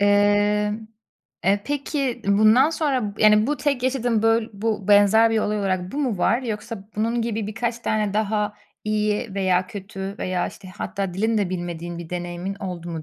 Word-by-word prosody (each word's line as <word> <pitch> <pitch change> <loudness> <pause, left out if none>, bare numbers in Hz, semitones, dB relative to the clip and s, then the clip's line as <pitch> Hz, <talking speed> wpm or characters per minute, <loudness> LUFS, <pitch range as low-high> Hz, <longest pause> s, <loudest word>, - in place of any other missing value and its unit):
Emm, 205 +1 +2 0.6
e, 200 +2 +3
peki 280 -3 -2
ı 200 - +4
bundan 220 +8 +6
sonra 260 -11 -1
b - - -2
yani, 215 0 +6
bu 295 +2 0
tek 280 -4 -1
yaşadığın 245 -4 +1
böl 225 0 +3
bu 210 -1 -2
benzer 205 +2 +6
bir 225 - +2
olay 210 0 0
olarak 185 -2 -1
bu 290 - -3
mu 250 -9 -1
var? 235 +8 +2
Yoksa 220 -2 -5
bunun 230 +2 0
gibi 225 -2 -2
birkaç 235 +2 -2
tane 215 -3 -1
daha 210 -1 0 0.3
iyi 215 0 -1
veya 185 -2 +1
kötü 195 -1 -6
veya, 185 -1 -1
işte, 190 - -12
hatta 195 -3 -3
dilini 220 +3 +1
de 195 -3 0
bilmediğin 175 -1 -5
bir 170 -2 -8
deneyimin 175 +2 -4
oldu 180 -4 -6
mu 165 -2 -5
210 Hz, 180 wpm, -23 LUFS, 195-230 Hz, 0.6 s, bundan